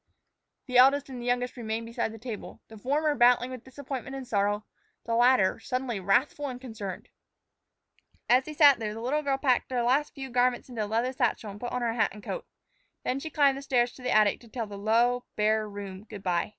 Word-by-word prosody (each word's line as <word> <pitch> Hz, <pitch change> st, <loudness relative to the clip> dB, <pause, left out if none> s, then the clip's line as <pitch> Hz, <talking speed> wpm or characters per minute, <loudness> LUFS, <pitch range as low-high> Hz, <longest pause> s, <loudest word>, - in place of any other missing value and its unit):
The 250 Hz, -2 st, +3 dB
eldest 275 Hz, +2 st, +5 dB
and 255 Hz, -2 st, -7 dB
the 240 Hz, -, -6 dB
youngest 245 Hz, 0 st, 0 dB
remained 225 Hz, -1 st, -4 dB
beside 230 Hz, -1 st, -3 dB
the 225 Hz, -, -9 dB
table, 225 Hz, -2 st, -7 dB
the 220 Hz, -, -11 dB
former 295 Hz, +6 st, +1 dB
battling 245 Hz, -1 st, +4 dB
with 255 Hz, -3 st, -8 dB
disappointment 270 Hz, 0 st, -7 dB
and 265 Hz, -2 st, -7 dB
sorrow, 205 Hz, -1 st, 0 dB, 0.4 s
the 230 Hz, -, -2 dB
latter 240 Hz, -4 st, +4 dB
suddenly 250 Hz, -4 st, -3 dB
wrathful 245 Hz, +10 st, +1 dB
and 250 Hz, -2 st, -6 dB
concerned. 220 Hz, -7 st, -7 dB, 1.2 s
As 255 Hz, +2 st, +4 dB
they 310 Hz, -, -7 dB
sat 290 Hz, -4 st, +6 dB
there, 215 Hz, -1 st, -3 dB
the -, -, -6 dB
little 280 Hz, +6 st, 0 dB
girl 275 Hz, -2 st, 0 dB
packed 260 Hz, -2 st, +1 dB
a -, -, -2 dB
few 240 Hz, -, +1 dB
last 270 Hz, +5 st, +1 dB, 0.2 s
garments 245 Hz, +1 st, +1 dB
into 230 Hz, -3 st, -3 dB
a -, -, -7 dB
leather 230 Hz, +4 st, 0 dB
satchel 235 Hz, -4 st, -1 dB
and 200 Hz, -, -11 dB
put 245 Hz, -, -5 dB
on 250 Hz, -1 st, -2 dB
her 230 Hz, -1 st, 0 dB
hat 230 Hz, -, +2 dB
and 210 Hz, -, -12 dB
coat. -, -, -5 dB, 0.6 s
Then 260 Hz, -, -1 dB
she 315 Hz, -, -6 dB
climbed 280 Hz, -3 st, +3 dB
the -, -, -9 dB
stairs 245 Hz, -3 st, +1 dB
to 260 Hz, -, -15 dB
the 250 Hz, -, -3 dB
attic 215 Hz, -3 st, +4 dB
to 235 Hz, -, -16 dB
tell 230 Hz, 0 st, -4 dB
the 205 Hz, -1 st, -9 dB
low, 235 Hz, +4 st, +2 dB
bare 215 Hz, 0 st, +1 dB
room 200 Hz, -1 st, -8 dB
good 205 Hz, -3 st, -10 dB
by. 175 Hz, -2 st, 0 dB
245 Hz, 220 wpm, -28 LUFS, 220-260 Hz, 1.2 s, sat